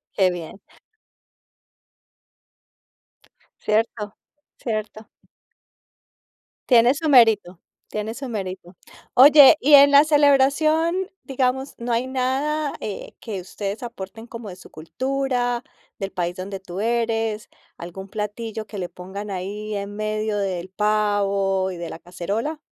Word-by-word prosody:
Qué 190 -2 +4
bien. 175 +2 -8 3.0
Cierto, 215 -1 -1 0.4
cierto. 215 -1 -5 1.6
Tiene 245 +2 +6
su 315 0 -2
mérito, 220 -9 +4 0.3
tiene 215 +2 -4
su 270 -1 -6
mérito. 185 -5 -6 0.4
Oye, 285 +3 +9
y 290 +2 +6
en 280 0 +8
la 285 +1 +8
celebración, 310 +5 +3
digamos, 265 0 -1
¿no 235 0 -3
hay 245 +3 0
nada, 275 +4 -1
eh, 205 - -6
que 210 -5 -5
ustedes 200 +4 -6
aporten 225 -1 -8
como 230 -3 -9
de 180 - -8
su 185 - -16
cultura, 250 - -2 0.4
del 195 0 -4
país 175 0 -3
donde 195 +1 -6
tú 190 0 -8
eres, 225 -1 -1 0.3
algún 185 +3 -8
platillo 215 +1 -5
que 205 -2 -8
le 180 - -4
pongan 195 +3 -8
ahí 205 +3 -5
en 200 0 -5
medio 215 0 -2
del 185 -2 -3
pavo 200 -2 +1
y 180 - -6
de 170 -1 -6
la 165 - -8
cacerola, 205 - -4
215 Hz, 120 wpm, -22 LUFS, 195-255 Hz, 3.0 s, Oye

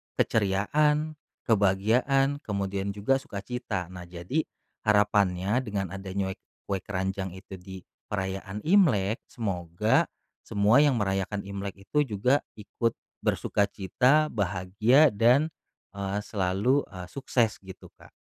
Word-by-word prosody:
keceriaan, 150 +10 +1 0.2
kebahagiaan 115 +7 +2
kemudian 100 -3 -3
juga 120 +7 +1
sukacita. 100 -5 -5
Nah, 90 -1 -9
jadi 90 - -3 0.4
harapannya 105 0 +3
dengan 100 -7 -3
ada 95 +1 -7
nyuek 95 -1 -2 0.2
kue 100 -1 -2
keranjang 95 0 -3
itu 95 0 -10
di 95 0 -10 0.3
perayaan 95 0 -3
Imlek, 125 - +3
semoga 105 - +1 0.4
semua 110 +6 +4
yang 135 -6 +3
merayakan 95 0 -1
Imlek 100 0 -6
itu 150 0 +2
juga 125 +3 +1 0.2
ikut 115 +2 -1 0.3
bersukacita, 125 +9 +2
bahagia, 100 +6 +3
dan, 125 +8 +4 0.5
eee, 100 0 -2
selalu, 100 +8 +1
eee, 90 -2 -8
sukses 120 -1 0
gitu, 95 -1 -11
Kak. - - -18
100 Hz, 110 wpm, -27 LUFS, 95-125 Hz, 0.5 s, semua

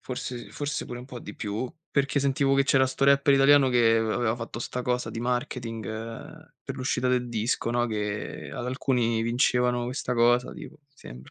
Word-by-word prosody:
Forse 125 -1 -6
forse 145 0 -3
pure 120 - -6
un - - -10
po' 125 -1 -9
di - - -9
più, 110 +4 -3 0.2
perché 140 0 +1
sentivo 135 0 +2
che 135 0 +3
c'era 135 -1 +4
sto 130 - -1
rapper 140 0 +5
italiano 135 0 +6
che 120 -2 +4
av 110 -1 0
aveva 115 0 0
fatto 115 0 -6
sta 125 +1 -4
cosa 125 -2 -1
di 115 - -5
marketing, 120 -3 -3
uhm, 115 +2 -8
per - - -5
l'uscita 130 0 -1
del 125 -1 +1
disco, 115 +1 -1
no, 120 0 +1
che 105 -2 -4
ad 120 - -5
alcuni 125 -3 0
vincevano 125 0 +1
questa 125 0 -3
cosa 120 +1 +3
tipo, - - -10
mi 145 -1 -44
sembra. 65 - -12
125 Hz, 195 wpm, -26 LUFS, 115-130 Hz, 0.2 s, italiano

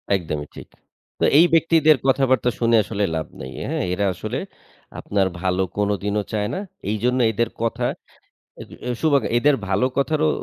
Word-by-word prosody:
একদমই 75 -5 -4
ঠিক। - - -10 0.5
তো - - +3
এই 170 - +8
ব্যক্তিদের 160 -2 +5
কথাবার্তা 130 -3 +3
শুনে 115 -1 +3
আসলে 105 -1 -3
লাভ 80 -2 -3
নেই। 65 -1 -7 0.2
হ্যাঁ? - - -1
এরা 100 +2 0
আসলে - - -4 0.6
আপনার 100 -2 0
ভালো 95 0 +1
কোনদিনও 105 0 0
চায় 105 -1 -1
না। 185 - -2 0.3
এইজন্য 125 +4 0
এদের 115 +2 0
কথা 120 +1 -1 0.7
অ্যাদ - - -10 0.3
শুভাগ 145 -4 +3 0.2
এদের 145 +2 +3
ভালো 100 +7 +2
কথারও 155 +3 +1
115 Hz, 150 wpm, -22 LUFS, 100-135 Hz, 0.7 s, এই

